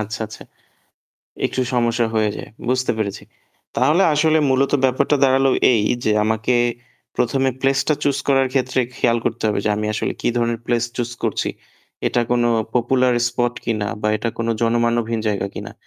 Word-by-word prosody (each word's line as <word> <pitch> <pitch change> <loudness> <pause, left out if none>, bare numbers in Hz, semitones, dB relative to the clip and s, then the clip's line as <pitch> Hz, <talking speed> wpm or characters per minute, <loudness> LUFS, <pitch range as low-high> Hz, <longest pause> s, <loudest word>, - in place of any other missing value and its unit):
আচ্ছা, 110 +1 -5
আচ্ছা। 110 - -11 1.0
একটু 130 - -1
সমস্যা 120 -1 +1
হয়ে 110 -1 +2
যায়। - - -8 0.2
বুঝতে 130 0 +1
পেরেছি। 100 -2 -3 0.5
তাহলে 150 +9 +3
আসলে 155 +1 +3
মূলত 135 +1 +2
ব্যাপারটা 135 +3 +2
দাঁড়ালো 135 0 +3 0.2
এই 110 -3 +2 0.2
যে 110 - +2
আমাকে 110 +3 0 0.6
১ম 130 +3 +1
এ - - -7
প্লেস 135 0 +2
টা 155 - +4
চুস 140 -1 +1
করার 135 -1 +4
ক্ষেত্রে 130 -1 +1 0.2
খেয়াল 120 0 +2
করতে 120 - -2
হবে 105 - 0
যে - - +1
আমি 105 - -2
আসলে - - -1
কি - - 0
ধরনের 120 -1 0
প্লেস 120 -1 +1
চুস 120 -1 -2
করছি। - - -1 0.6
এটা 120 - +1
কোন 120 -1 +2 0.3
পপুলার 125 +1 +2
স্পট 120 0 -1
কিনা 110 -3 -1 0.2
বা 105 - +1
এটা 110 +2 -2
কোন 115 - -1 0.2
জনমানবহীন 115 -1 +1
জায়গা 100 -1 -1
কিনা। - - -7
120 Hz, 170 wpm, -20 LUFS, 115-130 Hz, 1.0 s, টা